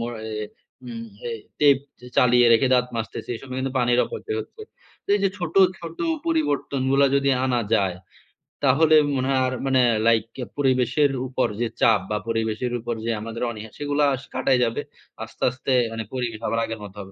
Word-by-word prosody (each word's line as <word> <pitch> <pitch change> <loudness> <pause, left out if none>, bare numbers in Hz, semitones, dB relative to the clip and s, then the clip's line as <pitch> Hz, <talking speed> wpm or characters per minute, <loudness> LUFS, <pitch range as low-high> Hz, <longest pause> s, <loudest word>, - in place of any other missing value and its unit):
মোর 120 +1 -3
অ্যা 110 -1 -5 0.4
উম 115 -1 -6 0.2
এই 115 - -4 0.2
টেপ 145 -2 +6 0.2
চে 125 - -13
চালিয়ে 125 -1 +5
রেখে 115 +3 +4
দাঁত 125 0 +2
মাজতেছি 110 -1 -5
এই - - -6
সময় 130 -1 -7
কিন্তু 130 0 -2
পানির 120 0 +2
অপচয় 430 0 -5
হচ্ছে। 435 0 -11 0.4
তো - - -50
এই 205 - +1
যে 195 - +4
ছোট, 175 -3 -4 0.2
ছোট 165 -1 -9 0.3
পরিবর্তনগুলা 140 - +1
যদি 140 0 +2
আনা 125 -2 +1
যায়, 95 -4 +1 0.7
তাহলে 155 +4 +5 0.2
মনে 130 0 0
হয় 130 - +2
আর 130 - -2
মানে 130 -1 +3 0.3
লাইক 115 -2 +4
অ্যা 125 - -3
পরিবেশের 135 +1 +2 0.2
উপর 130 -1 0
যে 120 - +1
চাপ 110 -3 +5
বা 105 - +1
পরিবেশের 115 +2 -1
উপর 120 +1 -3
যে 115 - 0
আমাদের 115 +2 -5
অনিহা 110 -1 -9
সেগুলা 145 0 0
আস 130 - -10
কাটাই 130 -2 +2
যাবে। 115 - -2 0.4
আস্তে, - - -9
আস্তে 130 +1 -2 0.2
মানে 115 0 -4
পরিবেশ 120 -4 -3
আবার 115 - 0
আগের 115 0 -6
মত 100 -2 -9
হবে। 95 -1 -9
125 Hz, 190 wpm, -23 LUFS, 115-135 Hz, 0.7 s, টেপ